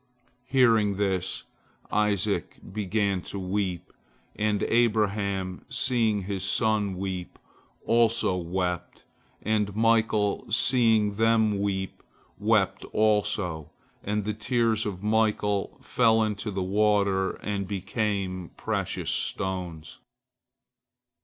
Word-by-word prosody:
Hearing 115 Hz, -6 st, +3 dB
this, 95 Hz, -2 st, -1 dB, 0.5 s
Isaac 105 Hz, -4 st, 0 dB, 0.2 s
began 100 Hz, -2 st, 0 dB
to 100 Hz, -, -7 dB
weep, 95 Hz, -2 st, -3 dB, 0.4 s
and 105 Hz, -1 st, 0 dB
Abraham, 100 Hz, -5 st, +1 dB
seeing 115 Hz, -6 st, +1 dB
his 95 Hz, 0 st, -3 dB
son 100 Hz, -1 st, +1 dB
weep, 95 Hz, -2 st, -5 dB, 0.5 s
also 115 Hz, -5 st, +3 dB
wept, 90 Hz, 0 st, -3 dB, 0.4 s
and 105 Hz, -2 st, 0 dB
Michael, 110 Hz, -2 st, +2 dB
seeing 110 Hz, -4 st, +3 dB
them 110 Hz, -2 st, +3 dB
weep, 95 Hz, -1 st, -2 dB, 0.4 s
wept 105 Hz, -2 st, +2 dB
also, 105 Hz, -7 st, 0 dB, 0.3 s
and 105 Hz, 0 st, -1 dB
the 105 Hz, -, -1 dB
tears 115 Hz, 0 st, 0 dB
of 95 Hz, -1 st, -6 dB
Michael 105 Hz, -2 st, +1 dB
fell 115 Hz, -2 st, +3 dB
into 105 Hz, 0 st, -2 dB
the 95 Hz, -2 st, -2 dB
water, 100 Hz, -1 st, +2 dB
and 100 Hz, -2 st, -3 dB
became 95 Hz, -2 st, -2 dB
precious -, -, -2 dB
stones. 90 Hz, -4 st, -3 dB
105 Hz, 95 wpm, -27 LUFS, 95-110 Hz, 0.5 s, Hearing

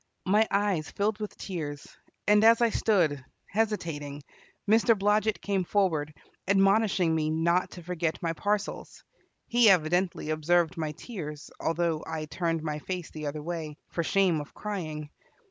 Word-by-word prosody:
My 210 Hz, +4 st, +4 dB
eyes 200 Hz, -6 st, 0 dB
filled 210 Hz, +1 st, -1 dB
with 210 Hz, -2 st, -6 dB
tears, 150 Hz, -6 st, -5 dB, 0.4 s
and 210 Hz, +1 st, +5 dB
as 230 Hz, +1 st, +7 dB
I 235 Hz, -1 st, +3 dB
stood, 165 Hz, -13 st, +2 dB, 0.3 s
hesitating, 165 Hz, -10 st, -2 dB, 0.4 s
Mr. 225 Hz, +1 st, +4 dB
Blodget 210 Hz, +2 st, +2 dB
came 195 Hz, -2 st, 0 dB
forward, 165 Hz, -6 st, +1 dB, 0.4 s
admonishing 195 Hz, -3 st, +3 dB
me 155 Hz, -1 st, 0 dB
not 170 Hz, +3 st, +1 dB
to 175 Hz, -, -10 dB
forget 170 Hz, -2 st, -2 dB
my 165 Hz, -1 st, -1 dB
parcels. 205 Hz, +3 st, -3 dB, 0.4 s
He 235 Hz, -2 st, +5 dB
evidently 175 Hz, -2 st, +2 dB
observed 165 Hz, +2 st, +2 dB
my 155 Hz, -3 st, -3 dB
tears, 150 Hz, -, -8 dB
although 165 Hz, -1 st, 0 dB
I 155 Hz, -1 st, -3 dB
turned 165 Hz, 0 st, -2 dB
my 150 Hz, -1 st, -3 dB
face 180 Hz, +1 st, -5 dB
the 155 Hz, -1 st, -5 dB
other 150 Hz, +1 st, -4 dB
way, 160 Hz, -3 st, -5 dB
for 170 Hz, -, -1 dB
shame 180 Hz, -3 st, +2 dB
of 145 Hz, -, -12 dB
crying. 155 Hz, -8 st, -5 dB
175 Hz, 145 wpm, -28 LUFS, 155-205 Hz, 0.4 s, as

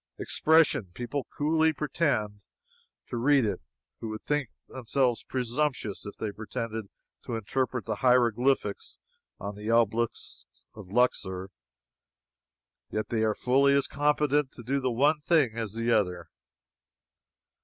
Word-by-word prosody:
Expression! 150 Hz, -, +3 dB
People 125 Hz, +3 st, -4 dB
coolly 160 Hz, +2 st, +3 dB
pretend 135 Hz, -9 st, -1 dB, 0.7 s
to 120 Hz, -, -2 dB
read 135 Hz, +1 st, +4 dB
it 105 Hz, -, -2 dB, 0.4 s
who 115 Hz, -, -5 dB
would 110 Hz, 0 st, -6 dB
think 145 Hz, -5 st, -1 dB, 0.2 s
themselves 125 Hz, -1 st, 0 dB
presumptuous 125 Hz, -4 st, -2 dB
if 100 Hz, -, -8 dB
they 110 Hz, -, -3 dB
pretended 110 Hz, 0 st, -5 dB, 0.4 s
to 120 Hz, -, -4 dB
interpret 125 Hz, +3 st, -2 dB
the 110 Hz, -2 st, -2 dB
hieroglyphics 125 Hz, -2 st, +2 dB, 0.4 s
on 100 Hz, +1 st, -5 dB
the 105 Hz, +2 st, -6 dB
obelisks 115 Hz, 0 st, -1 dB
of 100 Hz, -4 st, -12 dB
Luxor 95 Hz, -5 st, 0 dB, 1.4 s
yet 110 Hz, -, -3 dB
they 115 Hz, -2 st, 0 dB
are 110 Hz, -1 st, +1 dB
fully 140 Hz, +2 st, +3 dB
as 140 Hz, -1 st, +3 dB
competent 145 Hz, 0 st, +1 dB
to 120 Hz, -, -10 dB
do 135 Hz, +4 st, 0 dB
the 130 Hz, -1 st, 0 dB
one 145 Hz, +6 st, +3 dB
thing 150 Hz, -5 st, +3 dB
as 110 Hz, -3 st, -4 dB
the 115 Hz, +1 st, 0 dB
other. 90 Hz, -6 st, 0 dB
120 Hz, 130 wpm, -28 LUFS, 110-140 Hz, 1.4 s, read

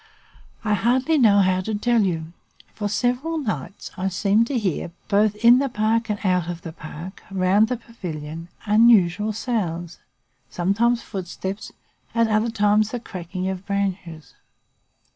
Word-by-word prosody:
I 210 Hz, -1 st, +1 dB
hardly 260 Hz, -, +2 dB
know 205 Hz, -5 st, +6 dB
how 185 Hz, -1 st, +2 dB
to 215 Hz, +3 st, -3 dB
tell 235 Hz, +2 st, +2 dB
you. 165 Hz, -4 st, -2 dB, 0.4 s
For 205 Hz, -1 st, -3 dB
several 250 Hz, +10 st, 0 dB
nights, 210 Hz, -, -4 dB
I 190 Hz, +1 st, -2 dB
seemed 205 Hz, +4 st, +2 dB
to 275 Hz, -, -1 dB
hear, 190 Hz, -7 st, -1 dB, 0.2 s
both 210 Hz, 0 st, +3 dB
in 235 Hz, +4 st, +6 dB
the 275 Hz, 0 st, 0 dB
park 225 Hz, +1 st, 0 dB
and 210 Hz, -, 0 dB
out 180 Hz, -3 st, +1 dB
of 170 Hz, -1 st, -6 dB
the 165 Hz, -, -7 dB
park, 160 Hz, +5 st, -9 dB
round 195 Hz, +3 st, +3 dB
the 250 Hz, +1 st, -2 dB
pavilion, 165 Hz, -8 st, -7 dB, 0.2 s
unusual 210 Hz, -2 st, +4 dB
sounds, 180 Hz, -7 st, -3 dB, 0.5 s
sometimes 225 Hz, +7 st, +1 dB
footsteps, 190 Hz, 0 st, -6 dB, 0.4 s
at 230 Hz, 0 st, +4 dB
other 215 Hz, +1 st, +1 dB
times 210 Hz, 0 st, +2 dB
the 245 Hz, -, -4 dB
cracking 185 Hz, -3 st, -5 dB
of 190 Hz, -1 st, -4 dB
branches. 190 Hz, -5 st, -3 dB
205 Hz, 145 wpm, -23 LUFS, 185-230 Hz, 0.5 s, know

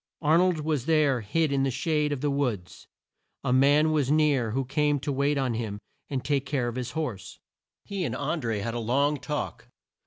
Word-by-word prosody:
Ar 155 Hz, +3 st, +5 dB
nold 180 Hz, -3 st, +2 dB
was 150 Hz, -3 st, -1 dB
there 150 Hz, -6 st, +3 dB
hid 155 Hz, +9 st, 0 dB
in 140 Hz, -1 st, +1 dB
the 135 Hz, -, +2 dB
shade 150 Hz, +3 st, 0 dB
of 140 Hz, -3 st, -3 dB
the 145 Hz, -1 st, 0 dB
woods. 120 Hz, -11 st, -3 dB, 0.6 s
A 125 Hz, -, +1 dB
man 145 Hz, +4 st, +4 dB
was 145 Hz, -4 st, +1 dB
near 145 Hz, -6 st, +3 dB
who 130 Hz, +4 st, -1 dB
came 145 Hz, +2 st, +1 dB
to 145 Hz, -, -3 dB
wait 140 Hz, +2 st, +1 dB
on 130 Hz, -3 st, 0 dB
him 110 Hz, -3 st, -3 dB, 0.3 s
and 135 Hz, -2 st, -3 dB
take 140 Hz, -2 st, 0 dB
care 135 Hz, -4 st, 0 dB
of 120 Hz, -, -4 dB
his 125 Hz, -1 st, -4 dB
horse. 105 Hz, -, -4 dB, 0.5 s
He 200 Hz, -2 st, -3 dB
and -, -, -2 dB
An 170 Hz, -2 st, -2 dB
dré 110 Hz, -5 st, -2 dB
had 115 Hz, +1 st, -3 dB
a 120 Hz, -, -2 dB
long 140 Hz, +6 st, +1 dB
talk. 150 Hz, +2 st, -4 dB
140 Hz, 210 wpm, -27 LUFS, 125-150 Hz, 0.6 s, Ar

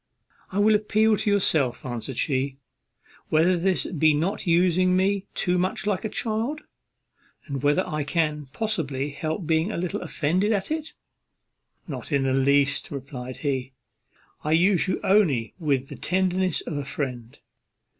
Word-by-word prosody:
"I 190 Hz, -, -4 dB
will 210 Hz, +1 st, +5 dB
appeal 215 Hz, +1 st, +3 dB
to 210 Hz, -, -1 dB
yourself," 160 Hz, -10 st, +1 dB
answered 120 Hz, +1 st, -4 dB
she, 135 Hz, -1 st, 0 dB, 0.7 s
"whether 165 Hz, +4 st, +4 dB
this 185 Hz, +2 st, 0 dB
be 155 Hz, -3 st, +2 dB
not 185 Hz, +6 st, -1 dB
using 180 Hz, +1 st, +3 dB
me 195 Hz, +1 st, +1 dB
too 180 Hz, 0 st, +1 dB
much 185 Hz, +2 st, -1 dB
like 205 Hz, -3 st, 0 dB
a 220 Hz, -, -2 dB
child, 230 Hz, +8 st, -2 dB, 0.8 s
and 140 Hz, -2 st, -4 dB
whether 145 Hz, +1 st, +2 dB
I 155 Hz, -1 st, -2 dB
can 150 Hz, -1 st, -1 dB
possibly 150 Hz, -8 st, -2 dB
help 155 Hz, +4 st, -3 dB
being 160 Hz, +5 st, +1 dB
a -, -, -3 dB
little 175 Hz, -1 st, -2 dB
offended 185 Hz, +8 st, 0 dB
at 200 Hz, +6 st, -2 dB
it?" 315 Hz, 0 st, -3 dB, 0.9 s
"Not -, -, -6 dB
in 140 Hz, -2 st, +2 dB
the 135 Hz, -1 st, +1 dB
least," 140 Hz, +1 st, +2 dB
replied 130 Hz, -2 st, -7 dB
he; 130 Hz, -2 st, -1 dB, 0.7 s
"I 150 Hz, -, +1 dB
use 180 Hz, +3 st, +3 dB
you 185 Hz, -, 0 dB
only 165 Hz, -, +2 dB
with 140 Hz, -5 st, 0 dB
the -, -, -7 dB
tenderness 185 Hz, -1 st, 0 dB
of 155 Hz, -, -5 dB
a 145 Hz, -, -2 dB
friend. 125 Hz, -4 st, -5 dB
165 Hz, 155 wpm, -25 LUFS, 140-190 Hz, 0.9 s, will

